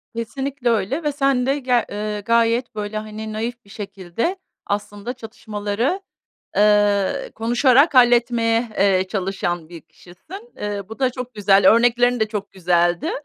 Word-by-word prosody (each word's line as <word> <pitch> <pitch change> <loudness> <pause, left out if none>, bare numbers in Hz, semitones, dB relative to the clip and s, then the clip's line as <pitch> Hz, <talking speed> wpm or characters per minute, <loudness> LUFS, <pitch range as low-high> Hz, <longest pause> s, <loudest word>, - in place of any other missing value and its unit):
Kesinlikle 265 +2 -3
öyle 235 - 0
ve 295 - 0
sen 275 -3 +1
de 275 +2 0
ger 250 -2 +1
eee, 210 0 -4
gayet 230 +2 +1
böyle, 210 0 -4
hani, 215 0 -6
naif 235 +1 -5
bir - - -20
şekilde 200 - -4 0.3
aslında 205 +3 -4
çatışmaları, 225 - -3 0.6
eee, 205 -1 +2
konuşarak 255 +6 +3
halletmeye, 235 -1 +3
eee, 190 -1 +3
çalışan 180 -4 -3
bir 170 -2 -10
kişisin. 330 - -14
Eee, 205 -1 -4
bu 220 - -9
da 260 -1 +2
çok 250 -1 -7
güzel, 195 -2 +5
örneklerin 245 +1 +3
de 215 - +1
çok 205 -2 -5
güzeldi. 175 -1 +1
220 Hz, 140 wpm, -21 LUFS, 205-245 Hz, 0.6 s, güzel